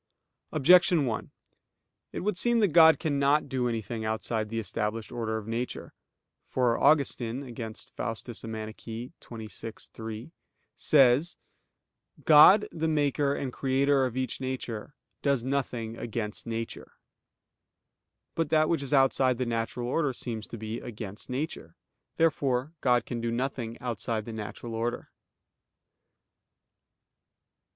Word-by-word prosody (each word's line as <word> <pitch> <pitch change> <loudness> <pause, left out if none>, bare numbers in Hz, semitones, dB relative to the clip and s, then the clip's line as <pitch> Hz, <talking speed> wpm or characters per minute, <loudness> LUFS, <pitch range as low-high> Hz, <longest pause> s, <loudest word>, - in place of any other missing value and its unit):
Objection 170 +1 +5
1: 115 -3 -3 0.8
It - - -4
would 205 +1 0
seem 235 +5 +3
that 205 -3 +4
God 160 0 +7
cannot 145 -1 +2
do 130 -2 -1
anything 115 -1 -3
outside 110 0 -2
the 115 - -4
established 105 +1 -3
order 115 -2 -2
of 110 - -6
nature. 115 +2 -4 0.5
For 125 -2 +2
Augustine 135 -4 +2
(Contra 110 -2 -6
Faust. 115 -1 -4
xxvi, 110 0 -7 0.8
3) 110 +5 -7 0.4
says: 140 +3 +4 0.9
"God 160 +7 +8
the 160 0 -2
Maker 145 -2 +1
and 130 -3 -4
Creator 135 0 +2
of 125 0 -7
each 130 0 -2
nature, 130 -2 -4 0.3
does 140 -4 +1
nothing 125 -4 -2
against 115 -2 -4
nature." 115 0 -5 1.4
But 165 -2 -1
that 155 0 +3
which 165 -4 +1
is 140 +1 -3
outside 130 -2 +3
the 125 - -1
natural 115 +1 -2
order 140 +1 0
seems 115 -3 -5
to 115 - -7
be 110 +1 -5
against 105 -2 -7
nature. 125 - -4 0.4
Therefore 145 -3 +1
God 125 -2 +3
can 120 -1 -4
do 115 - -1
nothing 120 -1 -3
outside 115 -2 -3
the 115 - -6
natural 110 +2 -6
order. 115 +2 -3
125 Hz, 125 wpm, -28 LUFS, 115-140 Hz, 1.4 s, God